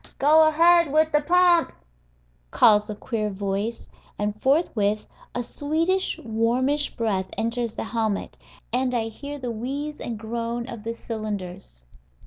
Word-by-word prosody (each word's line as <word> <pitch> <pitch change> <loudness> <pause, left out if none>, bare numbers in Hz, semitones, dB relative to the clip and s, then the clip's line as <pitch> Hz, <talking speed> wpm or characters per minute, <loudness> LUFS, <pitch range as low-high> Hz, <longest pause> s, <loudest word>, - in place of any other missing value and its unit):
"Go 310 +3 +6
ahead 335 0 +5
wid 310 +1 +3
de 295 - +3
pump," 350 +1 +4 0.8
calls 210 - +4
a 210 - -4
queer 215 -1 -3
voice, 200 +3 -3 0.3
and 210 +1 -3
forthwith 220 - +1 0.3
a 245 - -1
sweetish, 325 +9 -1
warmish 245 +6 0
breath 195 -5 -1
enters 230 +1 -1
the - - -3
helmet, 220 -3 -2 0.3
and 255 0 +1
I 225 -1 -1
hear 285 +6 -7
the 250 -3 -4
wheeze 280 +6 -4
and 230 -2 -4
groan 235 +2 -4
of 235 -4 -7
the 230 +1 -4
cylinders. 195 - -6
235 Hz, 135 wpm, -24 LUFS, 215-290 Hz, 0.8 s, Go